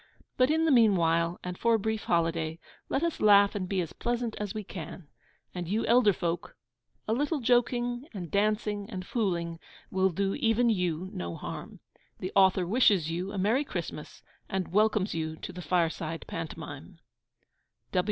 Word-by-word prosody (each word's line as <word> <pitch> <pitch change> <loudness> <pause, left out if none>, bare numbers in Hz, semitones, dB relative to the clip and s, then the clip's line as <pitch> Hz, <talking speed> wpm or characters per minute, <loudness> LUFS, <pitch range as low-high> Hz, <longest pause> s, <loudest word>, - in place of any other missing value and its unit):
But, 255 +1 +3
in 320 +1 +2
the 320 - +3
meanwhile, 170 -8 +3
and 180 0 -5
for 230 0 +3
a - - +1
brief 220 +1 -2
holiday, 165 -1 0 0.3
let 275 - 0
us 335 -1 -1
laugh 200 -1 +6
and 185 -3 -3
be 195 -2 +1
as 165 - -5
pleasant 240 -1 -2
as 210 -2 -3
we 215 +1 -4
can. 170 -3 -8 0.5
And 175 -2 -4
you 215 +5 0
elder 235 -3 +5
folk 175 -2 -3 0.5
a 220 - +1
little 290 +5 0
joking, 245 +1 +1
and 180 -7 -7
dancing, 210 0 0
and 185 -5 -6
fooling 170 -8 -1 0.3
will 190 0 +3
do 195 +2 -1
even 235 -2 +2
you 180 -2 -1
no 85 -1 -4
harm. - - -7 0.4
The 185 - -5
author 190 -2 +5
wishes 195 -5 +3
you 180 +4 -3
a 205 - -5
merry 220 +9 +2
Christmas, - - -6 0.3
and 190 -3 -2
welcomes 210 -1 +2
you 160 -1 -3
to 180 - -8
the 180 - -7
Fireside 165 -2 -1
Pantomime. 160 -2 -7
195 Hz, 165 wpm, -29 LUFS, 170-225 Hz, 0.5 s, laugh